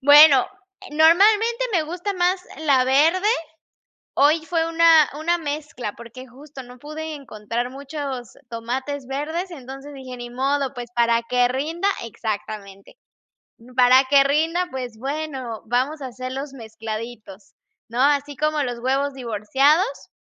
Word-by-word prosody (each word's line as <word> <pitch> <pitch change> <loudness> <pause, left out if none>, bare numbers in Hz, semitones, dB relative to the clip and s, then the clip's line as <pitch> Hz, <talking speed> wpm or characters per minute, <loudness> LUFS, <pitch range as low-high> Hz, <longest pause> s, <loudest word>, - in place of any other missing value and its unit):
Bueno, 290 -1 +8 0.3
e 380 -6 -11
normalmente 420 +10 +4
me 345 -5 +2
gusta 355 +6 -4
más 360 +1 +1 0.2
la 275 -5 +3
verde. 325 +10 +3 0.9
Hoy 300 +4 +4
fue 330 -1 0
una 330 -2 +5
una 340 +3 +1
mezcla, 290 -8 -5
porque 235 +3 -11
justo 275 +2 -12
no 250 0 -14
pude 310 +3 -6
encontrar 235 -2 -5
muchos 275 -3 -6
tomates 255 +4 -4
verdes, 315 +7 -3
entonces 275 -2 -9
dije: 260 -2 -9
"Ni 240 0 -8
modo, 275 +2 -1
pues, 240 -1 -7
para 235 -1 +2
que 245 +1 +2
rinda 320 +9 -1 0.2
exactamente. 205 - -6 0.8
Para 255 +1 +6
que 275 +1 +5
rinda, 320 +6 +1
pues 250 -4 -6
bueno, 270 -4 -5
vamos 260 +6 -1
a 260 - -4
hacerlos 255 +3 -6
mezcladitos", 220 -3 -8 0.3
¿no? 235 +2 -3
Así 285 0 +2
como 305 0 0
los 245 -2 -4
huevos 270 +2 0
divorciados, 270 - +1
275 Hz, 135 wpm, -22 LUFS, 245-310 Hz, 0.9 s, Bueno